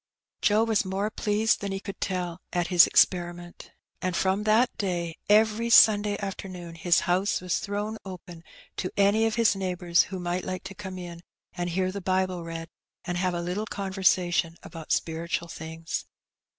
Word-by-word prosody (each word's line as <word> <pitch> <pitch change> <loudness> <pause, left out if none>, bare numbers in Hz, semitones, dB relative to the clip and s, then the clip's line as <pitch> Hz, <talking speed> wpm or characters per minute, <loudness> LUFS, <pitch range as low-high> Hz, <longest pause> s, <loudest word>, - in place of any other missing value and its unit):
Joe 215 +2 +4
was 225 -2 +2
more 195 +2 -2
pleased 215 +1 +1
than 200 -1 -3
he 195 - -3
could 195 0 -8
tell 180 -2 -3
at 175 0 -1
his 180 -2 +7
experi 175 -2 +3
ment, 175 0 -12 0.3
and 185 -1 -1
from 190 +4 +1
that 225 +3 +3
day 175 -4 -2
every 220 +2 +4
Sunday 210 -3 +6
afternoon 185 -3 -6
his 170 0 +2
house 185 +3 +1
was 180 -1 -1
thrown 205 +2 -3
open 180 -3 -10 0.3
to 185 - -2
any 205 +3 +4
of 225 - -2
his 230 -3 +3
neighbours 180 -3 +1
who 190 -1 -6
might 175 +1 -2
like 185 -1 -4
to 190 - -8
come 190 -2 -7
in, 175 -2 -8 0.3
and 175 -1 -3
hear 185 +2 0
the 200 +1 -6
Bible 185 -1 0
read, 165 0 -6 0.4
and 175 -1 -2
have 180 -1 0
a 170 - -2
little 190 +5 -3
conversation 185 -4 +1
about 165 -3 -9
spiritual 170 +1 -1
things. 160 +1 -5
185 Hz, 175 wpm, -27 LUFS, 175-205 Hz, 0.4 s, his